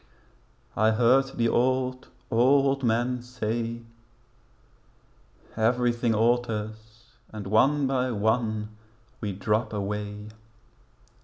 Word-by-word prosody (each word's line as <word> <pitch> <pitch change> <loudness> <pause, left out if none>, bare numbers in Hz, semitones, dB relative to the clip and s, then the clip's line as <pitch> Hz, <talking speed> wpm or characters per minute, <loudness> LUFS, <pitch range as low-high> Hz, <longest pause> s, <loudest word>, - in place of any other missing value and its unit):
I 110 +1 +3
heard 120 +4 +4
the 115 - +2
old, 130 +2 0 0.2
old 135 +3 +3
men 120 +2 0
say 115 -1 -4 1.7
'Everything 120 0 +1
alters, 110 -1 -2 0.2
And 105 -2 -7
one 135 +8 +3
by 130 -1 0
one 110 -1 0 0.5
we 105 -3 -3
drop 105 +5 -1
away.' 105 +1 -4
115 Hz, 85 wpm, -26 LUFS, 110-125 Hz, 1.7 s, heard